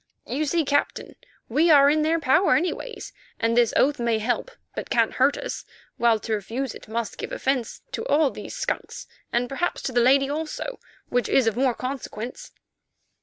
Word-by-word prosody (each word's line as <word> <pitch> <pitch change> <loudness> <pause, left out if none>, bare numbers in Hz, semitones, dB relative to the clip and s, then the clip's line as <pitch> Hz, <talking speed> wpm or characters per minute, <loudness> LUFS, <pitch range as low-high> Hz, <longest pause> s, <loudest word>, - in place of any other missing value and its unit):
You 290 +5 -1
see, 325 +2 +1
Captain, 285 +1 -1 0.3
we 305 +8 +3
are 285 -3 +7
in 305 +2 +3
their 320 +2 +2
power 315 +6 +4
anyway, 365 +7 -1 0.4
and 230 0 +1
this 240 -2 +4
oath 290 0 +3
may 235 -2 +1
help, 245 - -1 0.2
but - - -6
can't - - +2
hurt - - +3
us, - - -5 0.3
while 235 -2 +4
to 225 - -3
refuse 225 +5 -3
it - - -12
must 225 0 -4
give - - -5
offence 260 -3 -2
to - - -3
all 300 - +3
these - - -8
skunks, - - -4 0.3
and 245 +1 +1
perhaps 275 +7 -2
to - - -2
the 245 -1 +3
lady 270 +3 +5
also, 315 - -4 0.3
which 245 0 0
is 265 - +4
of 225 -2 +1
more 255 -1 +2
consequence." 255 - -6
270 Hz, 180 wpm, -24 LUFS, 235-310 Hz, 0.4 s, are